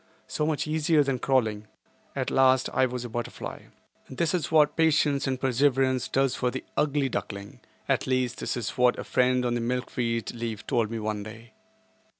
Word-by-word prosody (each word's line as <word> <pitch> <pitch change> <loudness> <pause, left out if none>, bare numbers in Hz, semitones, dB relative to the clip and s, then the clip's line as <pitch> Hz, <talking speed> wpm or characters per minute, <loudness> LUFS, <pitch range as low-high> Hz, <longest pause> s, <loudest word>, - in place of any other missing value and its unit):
So 150 - -2
much 155 -4 0
easier 155 0 +2
than 135 -2 -1
crawling. 110 -6 0 0.5
At - - -2
last 130 -1 +4
I 130 - +3
was 125 0 -5
a - - -6
butterfly. 120 +1 -6 0.4
This 155 +4 -1
is 170 -5 -1
what 150 -2 +4
patience 150 -3 +2
and 130 -1 -1
perseverance 130 0 +2
does 135 -1 +1
for 125 - 0
the 130 - -5
"ugly 145 -2 +1
duckling," 100 -5 -5 0.3
at - - +1
least 130 -1 0
that - - -2
is 115 -4 -3
what 125 0 +4
a - - -4
friend 125 0 +2
on 120 - 0
the 120 - -1
milkweed 120 -1 -2
leaf 115 -3 -5
told 115 -3 +1
me 115 - -4
one 105 -1 -3
day. 110 +3 -11
125 Hz, 180 wpm, -27 LUFS, 120-140 Hz, 0.5 s, last